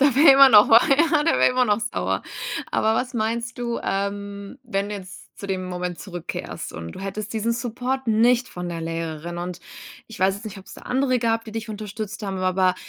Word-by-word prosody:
Der 275 -2 +4
wär 285 +1 +8
immer 275 0 +9
noch, 210 -3 +7
ja, 295 +7 +5
der 330 - +3
wär - - +5
immer 255 0 +2
noch 210 0 +1
sauer. 245 +2 -2 0.5
Aber 220 0 +2
was 250 +2 -2
meinst 230 +2 -2
du, 235 -1 -2
ähm, 200 +3 -4
wenn 200 -5 -2
du 210 - -4
jetzt 185 -2 -12
zu 200 - -6
dem 185 -1 -2
Moment 180 -1 -4
zurückkehrst, 175 -4 -6
und 85 +1 -7
du - - -9
hättest 200 +2 -5
diesen 225 +1 0
Support 245 +3 -3
nicht 240 +3 +3
von 180 0 -6
der 170 -1 -4
Lehrerin, 165 +1 -4
und 175 0 -5 0.5
ich 225 - -11
weiß 190 +1 +3
jetzt 205 - -11
nicht, 205 -2 -7
ob's 190 - -12
da - - -13
andere 255 0 +1
gab, 225 -1 0
die 220 - -9
dich 225 0 -5
unterstützt 210 0 -6
haben, 195 -2 -3
aber 185 0 +2
215 Hz, 210 wpm, -23 LUFS, 190-240 Hz, 0.5 s, immer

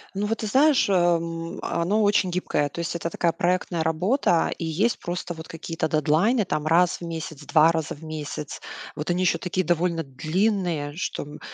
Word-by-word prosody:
Ну, 205 +1 -1
вот 225 - -1
ты 215 - -3
знаешь, 270 0 +4
э, - - +2
м, 170 -1 0
а, 170 - -1
оно 210 +5 +2
очень 205 -3 +3
гибкое. 160 -5 0
То 170 - -8
есть 170 0 -2
это 170 - -3
такая 170 0 +1
проектная 175 -1 0
работа, 175 - +2
и 165 - -4
есть 195 +9 +1
просто 175 0 -4
вот 160 0 -10
какие-то 165 -1 -3
дедлайны, 160 - +2
там 155 -4 -2
раз 175 +2 +3
в 170 - -7
месяц, 160 -3 -6
2 155 +3 +5
раза 160 -3 -2
в 155 - -15
месяц. 150 -1 -6 0.4
Вот 150 +3 -4
они 180 +1 +1
еще 180 - +3
такие 185 0 -2
довольно 170 -1 +1
длинные, 160 +2 -1
что, - - -3
м, 145 +1 -11
170 Hz, 200 wpm, -25 LUFS, 160-185 Hz, 0.4 s, 2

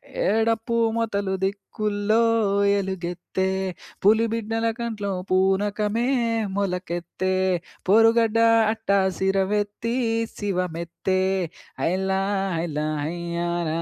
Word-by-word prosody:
హే! - - 0 0.2
డప్పు 225 +1 0 0.2
మొతల 205 -4 -1
దిక్కుల్లో 205 +2 0 0.6
ఎలుగెత్తే, 190 -1 -3 0.6
పులి 220 +3 +5
బిడ్డల 225 0 -1
కంట్లో 215 -4 -3 0.2
పూనకమే 205 +4 +1 0.5
మొలకెత్తే, 180 -1 -2 0.6
పొరుగడ్డ 225 +1 +5 0.4
అట్టసిరమెత్తి, 200 +2 0 0.4
శివమెత్తే. 180 -1 -2 0.6
హైలా 190 +2 0 0.4
హైల 165 -2 -3 0.3
హైయ్యాల 170 +1 -2
195 Hz, 70 wpm, -24 LUFS, 180-215 Hz, 0.6 s, పులి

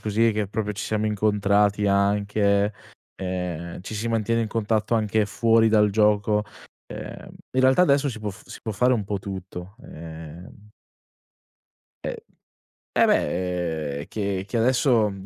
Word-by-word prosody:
così, 110 +2 +2
che 105 -1 -1
proprio 105 0 -2
ci 105 +2 -5
siamo 110 0 -1
incontrati 105 -1 +2
anche, 100 +1 +2 0.5
ehm, 90 -2 -4
ci 95 +4 -7
si 110 +2 -3
mantiene 115 0 +1
in 110 - -3
contatto 110 0 0
anche 110 -1 +2
fuori 115 +2 +3
dal 105 -1 +4
gioco. 105 0 +2 0.4
Ehm, - - -8 0.3
in - - +5
realtà 130 +7 +5
adesso 140 -3 +3
si 115 -4 -5
può 105 - -3
f 95 - -13
si - - -9
può 110 - -3
fare 125 +5 +3
un 110 -4 0
po' 100 0 -2
tutto. 95 0 -7
Ehm 80 +5 -11 1.4
E - - -5 0.7
eh - - +4
beh, 85 -3 0
ehm, 70 - -5
che 100 -3 -3
che 120 - -4
adesso 120 -2 +3
105 Hz, 150 wpm, -24 LUFS, 95-110 Hz, 1.4 s, in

